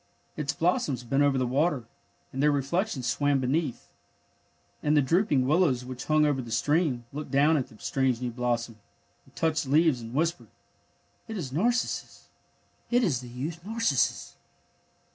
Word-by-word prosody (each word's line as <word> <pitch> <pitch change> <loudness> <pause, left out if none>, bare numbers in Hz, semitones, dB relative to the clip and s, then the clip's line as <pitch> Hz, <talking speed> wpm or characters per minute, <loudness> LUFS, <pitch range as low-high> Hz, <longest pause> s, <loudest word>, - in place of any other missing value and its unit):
Its 150 -2 -1
blossoms 145 -5 0
bent 135 +4 +1
over 140 -2 +3
the 130 - +1
water, 140 +1 +1 0.5
and 135 - -2
their 150 - +5
reflections 145 - -1
swam 145 +3 +1
beneath. 130 +1 -1 0.9
And 150 +1 +2
the - - +6
drooping 150 -3 +2
willows, 140 -4 +2
which 130 0 -7
hung 155 0 +3
over 145 -3 +1
the 120 - -9
stream, 140 +1 +1
looked 150 +1 -5
down 145 +3 +4
at 135 -4 0
the 110 - -17
strange 130 0 0
new 125 -1 -3
blossom, 120 -2 -2 0.5
and - - -23
touched 160 -3 0
leaves 150 -2 +3
and 115 +2 -8
whispered: 170 +3 0
^^ - - -31 0.8
It 220 -2 -5
is 145 -9 -5
Nar 190 - +3
cissus. 245 - -4 0.6
It 245 0 +3
is 140 - +1
the 125 - -10
youth 150 +8 -6
Narcissus! 215 - 0
140 Hz, 165 wpm, -27 LUFS, 125-160 Hz, 0.9 s, the